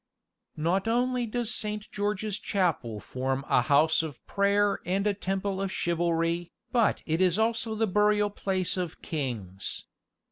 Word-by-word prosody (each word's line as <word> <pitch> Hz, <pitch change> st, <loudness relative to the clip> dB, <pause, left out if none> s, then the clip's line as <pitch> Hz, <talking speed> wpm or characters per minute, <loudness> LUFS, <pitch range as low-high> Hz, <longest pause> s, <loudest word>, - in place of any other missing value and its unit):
Not 175 Hz, +6 st, +1 dB
only 245 Hz, +1 st, +1 dB
does 240 Hz, +1 st, -1 dB
Saint 210 Hz, 0 st, -3 dB
George's 205 Hz, 0 st, -1 dB
Chapel 160 Hz, -, 0 dB
form 130 Hz, +4 st, -2 dB
a -, -, +4 dB
house 150 Hz, +5 st, +4 dB
of 150 Hz, -6 st, -7 dB
prayer 200 Hz, 0 st, +2 dB
and 190 Hz, +3 st, 0 dB
a 210 Hz, -, +3 dB
temple 195 Hz, 0 st, -2 dB
of 195 Hz, -1 st, -2 dB
chivalry, 170 Hz, -1 st, 0 dB, 0.2 s
but 235 Hz, -4 st, +2 dB
it 160 Hz, +2 st, 0 dB
is 185 Hz, 0 st, +3 dB
also 225 Hz, 0 st, 0 dB
the 225 Hz, +1 st, +2 dB
burial 210 Hz, +1 st, +3 dB
place 190 Hz, -2 st, -1 dB
of 180 Hz, -3 st, -4 dB
kings. 115 Hz, -, -3 dB
190 Hz, 145 wpm, -28 LUFS, 160-210 Hz, 0.2 s, a